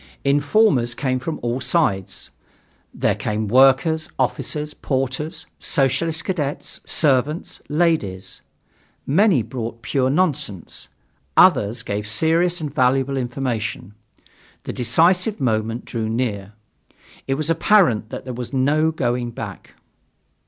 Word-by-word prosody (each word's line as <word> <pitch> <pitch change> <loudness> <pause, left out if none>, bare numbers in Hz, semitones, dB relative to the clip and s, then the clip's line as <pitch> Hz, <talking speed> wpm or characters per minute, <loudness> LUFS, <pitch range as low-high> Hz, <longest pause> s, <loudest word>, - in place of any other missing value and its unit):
Informers 140 - +2
came 130 -1 -1
from 155 +4 -4
all 120 +2 -1
sides. 100 - -1 0.6
There - - 0
came 110 0 -3
workers, 135 - +4
officers, 150 +3 -2
porters, 135 +3 -3
Socialist 160 +3 0
cadets, 150 -7 -3
servants, 150 +2 +1
ladies. 150 - -1 0.6
Many 170 - +3
brought 115 -2 -6
pure 130 -2 +1
nonsense. 140 - -1 0.5
Others 115 +4 +4
gave 105 -1 -3
serious 165 +10 +2
and 150 -3 -5
valuable 135 -1 +2
information. 120 -6 -3 0.7
The - - -5
decisive 175 - +2
moment 115 -2 -1
drew 110 -2 -3
near. 105 -4 -2 0.7
It 135 - +1
was 155 +3 -1
apparent 165 - +3
that - - -7
there 130 - -5
was 120 0 -6
no 145 +4 +2
going 120 -5 -1
back. 115 - -8
135 Hz, 110 wpm, -21 LUFS, 115-155 Hz, 0.7 s, workers